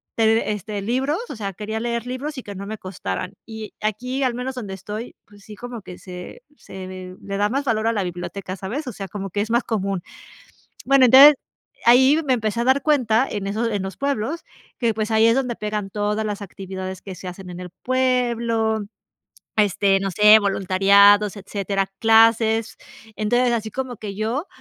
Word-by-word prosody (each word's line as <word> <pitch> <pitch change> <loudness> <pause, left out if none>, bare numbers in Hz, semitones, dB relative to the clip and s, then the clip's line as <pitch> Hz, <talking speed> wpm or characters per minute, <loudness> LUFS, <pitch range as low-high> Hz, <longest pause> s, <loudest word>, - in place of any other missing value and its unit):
tener 225 0 +4
este 210 0 -3
libros, 260 - 0
o - - -6
sea, 200 -3 -5
quería 215 +4 -4
leer 235 +1 -3
libros 270 +4 -5
y - - -9
que 205 - -8
no 195 +1 -6
me 215 0 -6
costaran. 185 - -5
Y 220 -2 -8
aquí, 250 +6 -2
al 255 -2 +1
menos 255 +2 -4
donde 210 -6 -6
estoy 210 +5 -7
pues 205 -1 -19
sí, 215 - -11
como 240 0 -8
que 180 - -10
se 180 - -9 0.2
se 185 -1 -9
le 195 0 -5
da 205 +1 +1
más 275 +5 -1
valor 225 -3 0
a 230 - +2
la 205 - 0
biblioteca, 185 +2 -5
¿sabes?, 235 - -5
o 245 - -4
sea, 195 0 -6
como 195 +1 -5
que 205 - -1
es 220 +2 -3
más 235 +1 +2
común. 195 -4 -2 0.9
Bueno, 270 -1 +6
entonces 275 +5 +9 0.5
ahí 260 +6 +6
me 260 - +3
empecé 220 -1 -2
a - - +1
dar 265 +2 +3
cuenta 255 -5 +2
en 200 -1 -4
esos 220 +4 -1
en 205 -3 -2
los 190 0 -6
pueblos 280 +3 -2 0.3
que 235 -2 +1
pues 215 0 -2
ahí 220 0 +4
es 230 - +4
donde 250 -3 -1
eran 210 -1 -3
todas 210 +2 -1
las 210 -1 -4
actividades 190 -1 -7
que 190 - -8
se 185 - -10
hacen 180 +1 -9
en 175 0 -8
el 180 -1 -8
pueblo 235 -4 +1 0.8
este, 200 -1 +3
no 195 0 -2
sé, 210 +4 +7
voluntariados, 200 +1 +4
etcétera, 195 0 -2
clases. 225 0 +4 0.4
Entonces, 240 +3 +2
así 220 -2 -2
como 260 0 -4
que 200 -2 -7
yo 230 - -2
215 Hz, 195 wpm, -22 LUFS, 195-240 Hz, 0.9 s, entonces